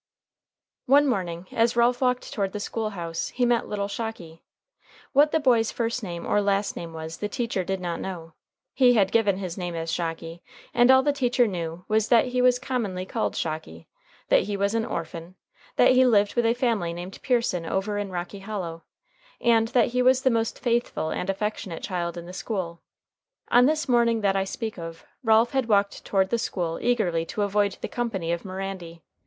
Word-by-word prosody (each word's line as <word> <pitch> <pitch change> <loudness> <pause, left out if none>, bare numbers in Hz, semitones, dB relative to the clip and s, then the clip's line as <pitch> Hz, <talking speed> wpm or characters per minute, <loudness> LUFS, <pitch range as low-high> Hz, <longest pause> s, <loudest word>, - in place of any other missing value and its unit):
One 285 +3 +6
morning, 180 -9 -2
as 230 +1 +2
Ralph 240 +1 +3
walked 250 -1 0
toward 195 -3 -1
the 210 - -3
school 220 +1 -3
house, 170 -5 -4
he 245 - 0
met 240 -1 +1
little 200 -1 -2
Shocky. 200 -6 -6 0.7
What 295 +2 +5
the 320 - +2
boy's 235 -6 +3
first 235 +1 -2
name 175 -5 -6
or 205 - +2
last 200 0 0
name 170 -1 -6
was 160 0 -7
the 210 - -3
teacher 230 -6 -2
did 190 +1 -2
not 175 -2 -3
know. 165 -4 -6 0.4
He 250 -2 +5
had 195 -4 +3
given 205 -4 +3
his 185 -2 -5
name 175 -1 -4
as 165 0 -3
Shocky, 165 0 -4 0.3
and 240 +1 +5
all 260 0 +7
the 290 0 +2
teacher 250 -3 +2
knew 170 -3 -4
was 215 0 +2
that 240 +1 +4
he 250 0 0
was 250 0 +5
commonly 230 -8 -3
called - - -2
Shocky, 155 - -5 0.4
that - - +5
he 205 0 -3
was 200 +1 0
an 225 -1 0
orphan, 170 -2 -6 0.4
that - - +5
he 255 0 +5
lived 210 -5 +3
with 240 -1 +2
a 230 - +2
family 225 -9 0
named 175 +3 -8
Pearson 230 -9 0
over 205 +3 -1
in 205 -1 -3
Rocky 180 +2 -5
Hollow, 185 -5 -5 0.6
and 225 -1 +3
that 240 -1 +2
he 250 +1 0
was 255 +1 +4
the 260 - +4
most 230 -1 0
faithful 235 -9 -1
and 180 - -3
affectionate 195 -3 -3
child 175 -2 -3
in 170 - -7
the 180 - -9
school. 185 -4 -4 0.7
On 245 +1 +6
this 310 +1 0
morning 235 -2 +3
that 195 -1 +2
I 195 0 +1
speak 220 0 -5
of, 165 -1 -8 0.2
Ralph 225 +1 +4
had 265 -3 0
walked 200 -1 +2
toward 190 -1 +1
the 235 - +1
school 170 -6 -2
early 185 -9 +1
to 210 - -2
avoid 200 0 +1
the - - -3
company 205 -9 -2
of 170 0 -1
Mirandy. 185 -3 -6
205 Hz, 195 wpm, -25 LUFS, 175-235 Hz, 0.7 s, all